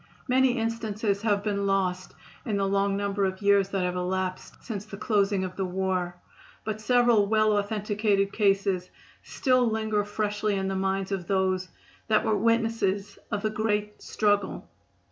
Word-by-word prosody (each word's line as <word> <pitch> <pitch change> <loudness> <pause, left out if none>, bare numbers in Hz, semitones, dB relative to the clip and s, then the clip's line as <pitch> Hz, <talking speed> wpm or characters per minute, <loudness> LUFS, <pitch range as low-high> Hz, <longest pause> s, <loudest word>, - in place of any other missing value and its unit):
Many 255 0 +3
instances 220 -3 -1
have 205 -2 +1
been 200 -1 -1
lost 185 -2 -1 0.3
in 210 -3 -1
the 195 - +1
long 195 0 +1
number 200 0 -1
of 190 +1 -3
years 200 -1 +4
that 195 -2 -1
have 180 0 -1
elapsed 185 +1 -3
since 210 -5 -5
the 210 -1 -9
closing 200 -3 +1
of 185 -1 -5
the 195 - -2
war, 185 -1 -1 0.5
but 215 0 -4
several 240 -2 +4
well 215 0 +3
authenticated 205 -1 0
cases 195 -3 +1 0.3
still 255 -1 +1
linger 220 -1 0
freshly 210 0 -1
in 190 0 -1
the 195 - -2
minds 190 0 -1
of 185 -3 -3
those 185 -1 0 0.4
that 215 -1 +2
were 215 - +2
witnesses 215 -2 0
of 205 -2 -2
the 215 - 0
great 210 -1 -1
struggle. 205 -2 0
200 Hz, 160 wpm, -27 LUFS, 195-215 Hz, 0.5 s, years